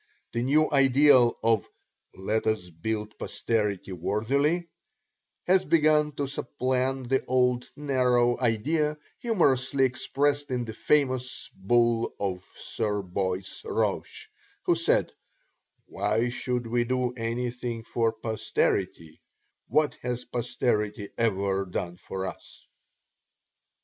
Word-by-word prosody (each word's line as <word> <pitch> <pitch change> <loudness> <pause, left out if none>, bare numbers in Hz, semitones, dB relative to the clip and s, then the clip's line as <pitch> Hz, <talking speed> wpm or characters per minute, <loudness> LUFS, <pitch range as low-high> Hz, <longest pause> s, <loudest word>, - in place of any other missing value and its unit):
The 120 - 0
new 150 +5 +3
ideal 135 -3 +5
of 115 -4 +2 0.5
"Let 105 +4 -1
us 110 -5 -1
build 105 +6 -4
posterity 100 -2 -1
worthily" 140 - 0 0.8
has 185 +1 +4
begun 150 -2 +3
to 140 0 -2
supplant 130 -1 -2
the 135 0 +2
old 125 -1 +1
narrow 125 -4 +2
idea 150 +6 +1 0.2
humorously 135 - +2
expressed 145 +3 0
in 125 -2 -1
the 110 - -6
famous 130 0 0
bull 115 +3 +1
of 95 -3 -2
Sir 105 +1 -3
Boyce 95 0 -3
Roche, - - -2 0.4
who - - +3
said, - - +2 0.7
"Why 105 +4 0
should 125 0 -2
we 120 +1 +1
do 125 0 -1
anything 120 0 -3
for 115 0 0
posterity 110 -7 -2 0.5
what 150 +3 +1
has 125 0 -3
posterity 105 -3 -1
ever 100 -3 +1
done 90 -1 -4
for 95 +1 -5
us?" 95 - -9
120 Hz, 110 wpm, -27 LUFS, 105-135 Hz, 0.8 s, ideal